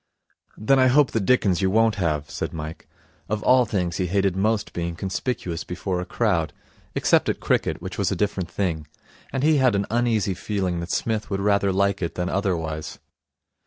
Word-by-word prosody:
'Then 135 +6 +3
I 130 - +5
hope 140 +2 +4
the 115 - 0
dickens 100 -4 +2
you 95 - +2
won't 110 +2 +3
have,' 75 -3 0
said - - -4
Mike. 80 0 -7 0.4
Of 105 +1 -2
all 125 -1 +5
things 90 -5 -2
he 95 - 0
hated 95 0 +1
most 105 +2 0
being 85 -1 -3
conspicuous 95 -2 -3
before 90 +1 -3
a 90 - -6
crowd 85 -10 0 0.4
except - - +3
at - - -1
cricket, - - 0
which - - -6
was - - +1
a - - 0
different 100 -4 -1
thing 85 -5 -2 0.4
and 135 0 -2
he 155 0 +4
had 130 -5 +3
an 100 0 0
uneasy 115 -4 +1
feeling 95 -2 -2
that 85 +1 -5
Psmith 110 +3 -1
would 100 -2 -1
rather 100 -1 +2
like 100 +1 +1
it 85 - -3
than 90 0 -2
otherwise. 80 -6 -2
100 Hz, 190 wpm, -24 LUFS, 85-110 Hz, 0.4 s, I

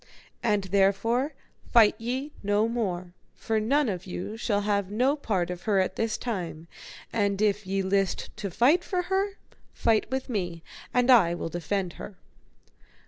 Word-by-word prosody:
And 210 -3 +1
therefore 200 - +1 0.4
fight 225 -4 +7
ye 255 +6 -3
no 205 +2 +2
more, 185 -7 -3 0.2
for 220 -1 -1
none 275 +6 +2
of 190 -3 -4
you 185 +4 -5
shall 215 -3 0
have 200 -2 0
no 250 +7 +2
part 190 - -1
of 180 -1 -6
her 200 - +3
at 185 - 0
this 225 -1 -1
time; 170 -8 -4 0.5
and 200 -3 +1
if 205 -1 +1
ye 195 0 0
list 195 0 0
to 200 - -3
fight 275 - +3
for 360 -1 -1
her, 390 +1 0 0.4
fight 225 -2 +2
with 265 0 -2
me, 175 -8 -3 0.3
and 250 +1 +3
I 180 -9 +6
will 165 - -4
defend 175 +2 -2
her. 200 - -8
205 Hz, 160 wpm, -27 LUFS, 190-235 Hz, 0.5 s, fight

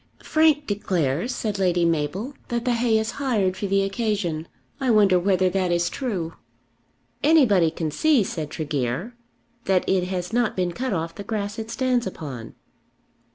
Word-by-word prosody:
"Frank 310 -2 +3
declares," 185 - -1
said 210 -3 -2
Lady 175 -2 +2
Mabel, 170 - -1
"that 235 0 -2
the 250 - +2
hay 230 -1 +2
is 220 +1 -1
hired 210 -9 +1
for 200 +2 -3
the 195 0 +2
occasion. 195 -6 -2 0.3
I 265 - 0
wonder 205 -5 +5
whether 185 0 +2
that 185 -2 0
is 175 0 +1
true." 190 -11 -3 0.9
"Anybody 245 - +5
can 160 -1 -3
see," 290 - +3
said 155 -5 -4
Tregear, 150 - -3 0.5
"that 190 -1 +2
it 185 -2 +2
has 180 +2 -4
not 240 -1 +1
been 180 -2 0
cut 255 +8 -3
off 165 -3 -2
the 200 - -8
grass 210 +1 -3
it 225 0 -5
stands 250 -2 0
upon." 135 -11 -7
195 Hz, 160 wpm, -24 LUFS, 170-230 Hz, 0.9 s, wonder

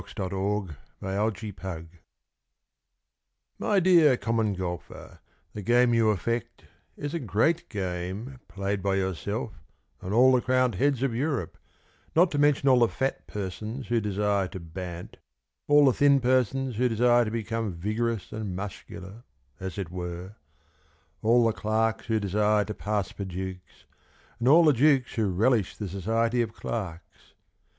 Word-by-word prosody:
TO 95 - -15
THE 95 -2 -3 0.7
COMMON 100 +3 -1
GOLFER 95 -5 -7 1.7
My 205 -2 +2
dear 170 -7 +5
Common 115 -4 0
Golfer, 90 -2 -7 0.3
The 105 - -6
game 120 +3 +3
you 115 -1 +3
affect 115 +4 -2 0.3
Is 145 +1 -5
a 170 - -1
great 130 - 0
game 95 +6 -4
Played 100 0 -3
by 100 0 0
yourself 95 +3 -2 0.5
And 95 - -5
all 125 +4 +6
the 125 -1 +3
crowned 130 -1 +2
heads 135 +5 +1
of 135 -4 0
Europe, 135 +2 -2 0.6
Not 175 +2 +5
to 145 - -1
mention 145 -1 +3
all 130 -2 +6
the 120 - +5
fat 135 +4 -3
persons 105 +5 -5
who 120 -1 +2
desire 100 -1 0
to 95 - -8
bant, 85 +1 -8 0.5
All 145 0 +6
the 130 - +5
thin 140 +1 +4
persons 130 -1 +1
who 125 +1 +2
desire 120 +1 +4
to 110 - -2
become 115 -1 -2
Vigorous 110 +3 -2
and 105 -4 -4
muscular, 95 +2 -8 0.4
as 95 0 -6
it 95 -4 -4
were, 90 +1 -6 0.9
All 120 +2 +4
the 115 - +2
clerks 110 +1 -1
who 110 -2 +1
desire 105 +1 +2
to 105 - -5
pass 105 -2 -2
for 100 - -6
dukes, 95 0 -7 0.5
And 120 - 0
all 160 +5 +7
the 150 - +6
dukes 135 0 +3
who 110 -3 0
relish 105 +2 +1
the 105 - -4
society 115 +6 0
of 110 -2 -3
clerks. 90 -7 -7
110 Hz, 150 wpm, -27 LUFS, 95-125 Hz, 1.7 s, all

